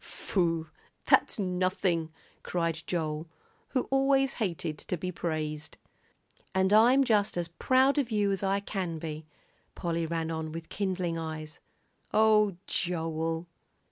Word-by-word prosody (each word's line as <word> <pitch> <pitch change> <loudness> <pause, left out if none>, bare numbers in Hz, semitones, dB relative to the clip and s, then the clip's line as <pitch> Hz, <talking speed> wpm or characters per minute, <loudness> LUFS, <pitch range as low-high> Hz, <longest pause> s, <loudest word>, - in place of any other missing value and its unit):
"Phoo! 165 -4 -1 0.4
that's - - +4
nothing!" 180 -3 0 0.3
cried 165 -2 -1
Joel, 160 -2 -2 0.4
who 255 - +1
always 270 0 +3
hated 170 -6 -2
to 180 - -3
be 180 +3 -3
praised. 155 -3 -4 0.8
"And 190 +1 +3
I'm 245 +6 +6
just 210 -7 +2
as 170 -1 -2
proud 260 - +3
of 260 -4 0
you 205 -3 +2
as 195 - -1
I 195 0 +1
can 185 -5 -3
be," 155 -1 -6 0.5
Polly 165 -1 -1
ran 165 0 -2
on 160 -1 -3
with 165 0 -7
kindling 185 -4 -1
eyes. 155 -1 -6 0.6
"Oh, 210 -3 +4
Joel!" 165 -1 -2
175 Hz, 130 wpm, -29 LUFS, 160-205 Hz, 0.8 s, I'm